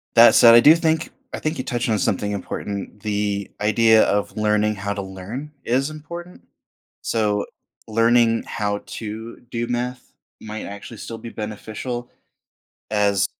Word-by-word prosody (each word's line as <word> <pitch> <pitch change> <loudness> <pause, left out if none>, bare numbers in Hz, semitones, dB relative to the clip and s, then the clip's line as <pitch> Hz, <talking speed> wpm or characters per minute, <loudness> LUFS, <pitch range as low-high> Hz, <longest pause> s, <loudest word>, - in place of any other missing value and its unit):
That 115 +1 +8
said, 115 -1 +9
I 120 - +10
do 150 +6 +8
think 160 -1 0 0.2
I - - -3
think 155 +1 -2
you 130 - -3
touched 120 -1 -2
on 110 - +2
something 100 +2 0
important. 100 +1 -5
The 105 -2 -1
idea 110 +1 +5
of 100 0 0
learning 105 0 +2
how 100 0 -3
to 100 - -4
learn 100 +10 -7
is 135 +5 +1
important, 170 +3 -9 0.6
so 105 -2 0 0.4
learning 115 +1 +3
how 105 -2 -2
to 110 +1 -7
do 120 0 -2
math 125 +1 -3 0.3
might 110 0 -6
actually 100 +3 -9
still 115 +2 -7
be 115 - -8
beneficial, 110 +3 -5 0.8
as 100 -2 +2
110 Hz, 150 wpm, -22 LUFS, 105-120 Hz, 0.8 s, I